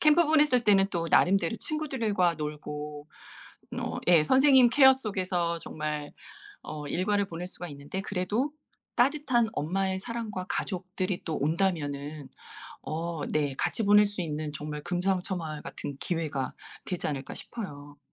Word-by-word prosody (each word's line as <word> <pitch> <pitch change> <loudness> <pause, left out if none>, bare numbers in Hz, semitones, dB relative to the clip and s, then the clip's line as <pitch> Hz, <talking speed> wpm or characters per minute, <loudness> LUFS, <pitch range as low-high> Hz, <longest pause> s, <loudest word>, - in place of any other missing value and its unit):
캠프 310 +2 +5
보냈을 295 -6 +4
때는 195 -2 +5
또 170 -4 -1
나름대로 190 +2 +4
친구들과 230 - 0
놀고 150 0 -6 0.7
어 - - -3
예 170 -3 +6
선생님 260 - +6
케어 265 +1 +7
속에서 185 -8 -1
정말 150 -2 -4 0.5
어 150 -1 -6
일과를 200 +5 +1
보낼 175 -1 -6
수가 180 -1 -7
있는데 145 +5 -6
그래도 205 +9 -1 0.4
따뜻한 255 -3 +3
엄마의 190 +3 -1
사랑과 220 -4 -4
가족들이 185 -1 -3
또 160 - -2
온다면은 150 -3 -1 0.5
어 165 0 -4
네 145 -3 0
같이 225 - 0
보낼 205 +1 +7
수 205 -2 -2
있는 155 -2 -3
정말 150 +1 -5
금상첨화 180 -4 -1
같은 140 - -6
기회가 155 -6 -2 0.3
되지 180 - -2
않을까 135 -3 -4
싶어요. 145 -10 -7
180 Hz, 300 characters per minute, -28 LUFS, 150-210 Hz, 0.7 s, 케어